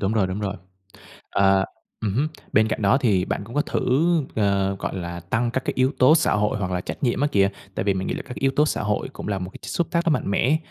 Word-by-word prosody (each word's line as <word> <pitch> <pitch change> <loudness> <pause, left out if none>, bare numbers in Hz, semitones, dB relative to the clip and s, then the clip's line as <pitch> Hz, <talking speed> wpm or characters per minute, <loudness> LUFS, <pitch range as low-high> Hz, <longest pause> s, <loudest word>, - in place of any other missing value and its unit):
đúng 100 +2 0
rồi, 105 -4 +2
đúng 95 +3 -4
rồi. 100 -1 -2 0.8
À. 95 -1 +4 0.4
Ừm 105 -3 -1
hứm. 145 +6 +1 0.2
Bên 110 +1 +4
cạnh 110 - -2
đó 100 +7 +4
thì 100 -8 +2
bạn 100 - -3
cũng 115 - -11
có 145 - +2
thử, 130 +3 0 0.3
ờ, 100 -2 +1
gọi - - -4
là, 85 -1 -5
tăng 115 +7 -1
các 130 +2 -2
cái - - -1
yếu 130 +2 +3
tố 130 +5 +7
xã 165 - +3
hội 105 0 +1
hoặc 90 -2 -2
là 90 0 -1
trách - - -7
nhiệm 125 0 +1
á 145 - +3
kìa, 100 -1 +4 0.2
tại - - -2
vì 100 -2 +2
mình 95 0 -2
nghĩ - - -1
là - - -5
các 125 - -9
yếu 135 - +2
tố 150 +1 +4
xã - - -1
hội 105 -1 -1
cũng - - -7
là 100 - -1
một 90 0 -5
cái - - -12
chất - - -7
xúc 170 - 0
tác 170 -1 +1
rất 170 - +2
mạnh 100 - -1
mẽ, 135 +9 +3
105 Hz, 285 wpm, -23 LUFS, 95-130 Hz, 0.8 s, tố